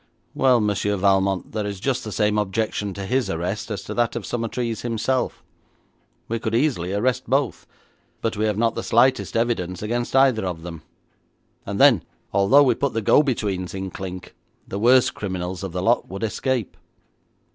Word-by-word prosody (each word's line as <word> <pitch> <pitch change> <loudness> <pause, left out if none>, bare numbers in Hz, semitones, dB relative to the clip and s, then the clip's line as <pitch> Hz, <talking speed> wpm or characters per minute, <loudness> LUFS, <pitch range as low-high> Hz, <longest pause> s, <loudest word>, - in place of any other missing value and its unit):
'Well, 130 -2 +4
Monsieur 105 -1 0
Valmont, 95 -1 +1
there 105 -1 -2
is 100 -2 -5
just 130 +4 -1
the 110 - -6
same 105 0 +1
objection 105 0 -1
to 100 - -5
his 125 0 0
arrest 90 +6 -3
as 105 - -4
to - - -6
that 120 -1 0
of 120 - -4
Summertrees 115 -1 -3
himself. 120 +2 -1 0.8
We 115 0 -2
could 110 0 -2
easily 115 - +1
arrest 125 +4 0
both, 135 -1 0 0.5
but 115 -1 -2
we 105 +1 0
have 105 -2 0
not 115 0 +2
the - - -3
slightest 120 0 +2
evidence 105 -6 -1
against 120 +4 -2
either 135 -5 +4
of 90 -3 -4
them, 85 -2 -8 0.9
and 100 0 -3
then, 135 - +6 0.3
although 115 +9 +5
we 130 -3 +4
put 140 +3 -2
the 115 0 -2
go 145 - +6
betweens 100 - -2
in 95 -1 -4
clink, 90 0 -7 0.3
the 100 - -4
worst 125 +3 +4
criminals 95 -2 -4
of 95 -2 -5
the 90 +1 -3
lot 120 +4 +2
would 95 +4 -6
escape.' 125 +1 -2
110 Hz, 180 wpm, -23 LUFS, 95-120 Hz, 0.9 s, then